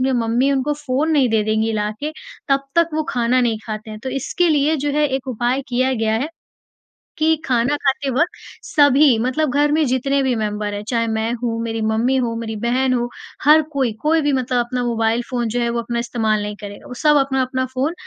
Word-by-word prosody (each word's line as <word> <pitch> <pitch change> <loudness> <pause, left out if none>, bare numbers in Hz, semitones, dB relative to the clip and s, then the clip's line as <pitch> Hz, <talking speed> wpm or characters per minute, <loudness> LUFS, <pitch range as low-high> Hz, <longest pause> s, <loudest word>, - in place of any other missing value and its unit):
उन्हें 265 +1 +1
मम्मी 235 +4 +1
उनको 275 +2 0
फ़ोन 290 +1 -1
नहीं 285 -5 +3
दे 220 -1 +2
देंगी 220 +1 0
ला 210 -1 -1
के, 300 +2 -3 0.4
तब 275 0 +2
तक 335 -1 +4
वो 315 - +1
खाना 245 +1 +1
नहीं 235 -3 +1
खाते 215 0 -6
हैं। 215 - -7
तो 265 - -4
इसके 275 +7 0
लिए 305 0 +2
जो 290 0 -1
है 295 +1 +2
एक 265 0 -3
उपाय 250 +2 -1
किया 255 +1 +1
गया 220 -2 0
है 275 +6 -2 0.9
कि 315 +1 +3
खाना 250 +2 +1
खाते 275 0 0
वक़्त 315 +8 0 0.3
सभी 285 -3 +5
मतलब 260 +6 0
घर 290 +1 +3
में 310 +1 +3
जितने 275 +2 +1
भी 260 -1 +1
मेंबर 210 -1 -2
हैं, 205 0 -5
चाहे 230 -2 0
मैं 220 +1 -1
हूँ, 230 -2 -1
मेरी 225 -1 -3
मम्मी 220 +4 +1
हो, 240 -3 0
मेरी 225 -1 -4
बहन 255 +2 +1
हो, 240 -1 -1 0.3
हर 305 +2 +7
कोई, 265 -4 +1
कोई 320 +2 +2
भी 290 -1 +1
मतलब 255 -1 0
अपना 250 +1 -3
मोबाइल 230 -1 +1
फ़ोन 240 -2 -1
जो 235 +2 -2
है, 235 - 0
वो 235 0 -1
अपना 235 0 -3
इस्तेमाल 220 -3 0
नहीं 210 0 -4
करेगा। 205 -1 -9
वो - - -8
सब 300 -1 +5
अपना-अपना 265 -2 0
फ़ोन 270 +5 0
255 Hz, 220 wpm, -20 LUFS, 230-280 Hz, 0.9 s, हर